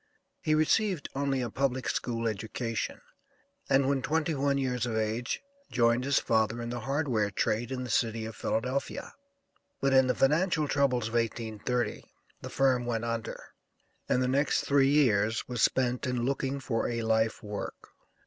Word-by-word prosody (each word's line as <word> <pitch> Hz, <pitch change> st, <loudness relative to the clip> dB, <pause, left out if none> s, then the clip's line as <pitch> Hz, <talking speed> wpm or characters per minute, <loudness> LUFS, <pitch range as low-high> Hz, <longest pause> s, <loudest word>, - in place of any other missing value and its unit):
He 155 Hz, -, +2 dB
received 175 Hz, +1 st, +1 dB
only 135 Hz, -1 st, 0 dB
a 120 Hz, -, -4 dB
public 130 Hz, 0 st, -1 dB
school 115 Hz, -2 st, -1 dB
education, 110 Hz, +2 st, -3 dB, 0.7 s
and 135 Hz, 0 st, +4 dB
when 140 Hz, -1 st, +1 dB
twenty 160 Hz, +3 st, 0 dB
one 140 Hz, -1 st, +1 dB
years 125 Hz, -3 st, -1 dB
of 110 Hz, -2 st, -2 dB
age 110 Hz, -, -2 dB, 0.3 s
joined 120 Hz, +1 st, +3 dB
his 140 Hz, -1 st, +2 dB
father 110 Hz, +1 st, +1 dB
in 120 Hz, 0 st, -4 dB
the 120 Hz, -, -3 dB
hardware 130 Hz, -4 st, 0 dB
trade 110 Hz, +5 st, -1 dB
in 130 Hz, -1 st, -3 dB
the 125 Hz, -, -6 dB
city 110 Hz, +1 st, 0 dB
of 110 Hz, 0 st, -7 dB
Philadelphia; 125 Hz, +6 st, -2 dB, 0.7 s
but 135 Hz, 0 st, +2 dB
in 130 Hz, -1 st, +6 dB
the 125 Hz, -, +1 dB
financial 155 Hz, +2 st, +2 dB
troubles 125 Hz, -5 st, +1 dB
of -, -, -11 dB
1830, 115 Hz, 0 st, -1 dB, 0.4 s
the -, -, -6 dB
firm 130 Hz, -3 st, +2 dB
went 115 Hz, -1 st, -1 dB
under, 115 Hz, -1 st, -4 dB, 0.6 s
and 125 Hz, -, +2 dB
the -, -, +1 dB
next 140 Hz, +3 st, +2 dB
three 140 Hz, -1 st, +4 dB
years 110 Hz, -7 st, +2 dB
was 120 Hz, -3 st, -3 dB
spent 125 Hz, 0 st, +2 dB
in 125 Hz, -2 st, -1 dB
looking 135 Hz, +1 st, -1 dB
for 115 Hz, -4 st, -1 dB
a 115 Hz, -1 st, -2 dB
life 110 Hz, 0 st, +1 dB
work. 105 Hz, -1 st, -6 dB
125 Hz, 165 wpm, -29 LUFS, 115-135 Hz, 0.7 s, in